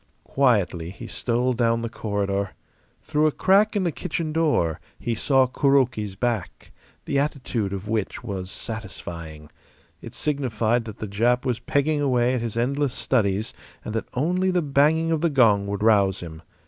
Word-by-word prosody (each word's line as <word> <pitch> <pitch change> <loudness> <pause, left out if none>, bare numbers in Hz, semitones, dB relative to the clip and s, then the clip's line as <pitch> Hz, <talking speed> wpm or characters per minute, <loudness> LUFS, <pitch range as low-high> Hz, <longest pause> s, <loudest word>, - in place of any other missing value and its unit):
Quietly 100 -11 +1
he 95 - -9
stole 125 +1 0
down 115 -1 +1
the - - -1
corridor. 100 -3 -2 0.5
Through 150 +1 +2
a - - +2
crack 205 +7 +3
in 200 - +1
the 175 - +1
kitchen 160 -1 -3
door 150 - +1 0.2
he 120 - -2
saw 130 +3 +3
Kuroki's 130 -7 +1
back, 115 -2 -3 0.3
the 140 - +1
attitude 125 -8 -2
of 100 +1 -5
which 110 +1 -2
was 95 -5 -5
satisfying. 85 -9 -8 0.5
It - - -10
signified 120 -5 0
that 110 -1 -8
the 110 - -5
Jap 120 +6 +1
was 125 -2 0
pegging 150 +2 0
away 125 -3 +2
at 125 - -1
his 115 -1 -4
endless 135 +2 0
studies 105 -4 0 0.3
and 110 - -4
that 110 - -3
only 180 +8 +1
the 180 -2 +1
banging 150 +3 +3
of 160 -2 +1
the 170 - +2
gong 110 -8 +4
would 100 +1 -3
rouse 100 -4 +3
him. 80 -2 -8
120 Hz, 165 wpm, -24 LUFS, 100-140 Hz, 0.5 s, gong